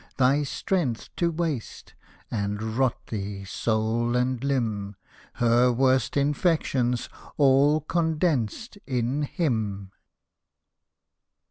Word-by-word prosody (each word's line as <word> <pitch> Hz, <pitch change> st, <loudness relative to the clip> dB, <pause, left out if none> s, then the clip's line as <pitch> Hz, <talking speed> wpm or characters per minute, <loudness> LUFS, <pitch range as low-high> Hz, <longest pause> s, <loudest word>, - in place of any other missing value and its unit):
Thy 135 Hz, +3 st, +4 dB
strength 145 Hz, -, -2 dB
to 170 Hz, -, +2 dB
waste, 160 Hz, -7 st, -4 dB, 0.4 s
and 105 Hz, +1 st, -2 dB
rot 130 Hz, -1 st, +2 dB
thee, 100 Hz, -2 st, -5 dB
soul 115 Hz, +3 st, 0 dB
and 125 Hz, 0 st, 0 dB
limb, 110 Hz, -7 st, -1 dB, 0.4 s
Her 120 Hz, +1 st, +3 dB
worst 130 Hz, +1 st, +2 dB
infections 140 Hz, -4 st, +1 dB, 0.3 s
all 145 Hz, +2 st, +4 dB
condensed 160 Hz, -, -1 dB
in 130 Hz, +2 st, 0 dB
him 110 Hz, -, -2 dB
125 Hz, 90 wpm, -26 LUFS, 110-145 Hz, 0.4 s, Thy